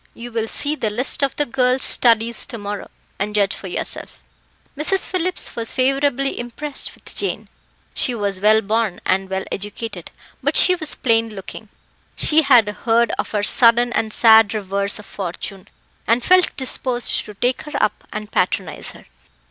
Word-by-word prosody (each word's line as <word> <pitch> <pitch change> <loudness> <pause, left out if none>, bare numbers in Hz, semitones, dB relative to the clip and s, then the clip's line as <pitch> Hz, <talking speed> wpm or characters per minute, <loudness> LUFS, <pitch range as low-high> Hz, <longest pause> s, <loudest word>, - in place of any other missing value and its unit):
You 240 +1 -9
will 225 -1 -2
see 290 +6 0
the 225 -8 -2
list 245 +8 0
of 275 -1 0
the 295 - +1
girls' 255 0 +1
studies 230 -1 +3
to 235 - -7
morrow, 205 -1 -6 0.3
and 210 +2 -2
judge 200 -2 +2
for 195 - -8
yourself." 180 - -4 0.6
Mrs. 310 +7 0
Phillips 365 0 -2
was 230 -1 -2
favourably 275 +1 0
impressed 270 +4 -5
with - - -12
Jane. - - -2 0.4
She 250 - 0
was 200 -3 -2
well 215 +1 +5
born 220 -2 -1
and 190 0 0
well 190 0 -2
educated, 205 -2 -6 0.3
but 285 +3 0
she 365 - +5
was 320 -4 -1
plain 230 -2 +1
looking. 210 +1 -9 0.5
She 315 +1 +5
had 250 -7 +5
heard 230 +2 +1
of - - -2
her 210 -1 -1
sudden 240 +2 +4
and 220 -1 -1
sad 220 -1 +5
reverse 200 -1 -2
of 210 - -12
fortune, 190 0 -6 0.4
and 235 +2 +2
felt 365 +3 +3
disposed 255 -2 -1
to 210 - -11
take 245 +5 0
her 300 - -9
up 210 - 0
and 215 0 -6
patronise 180 -3 -1
her. - - -16
230 Hz, 170 wpm, -20 LUFS, 205-260 Hz, 0.6 s, well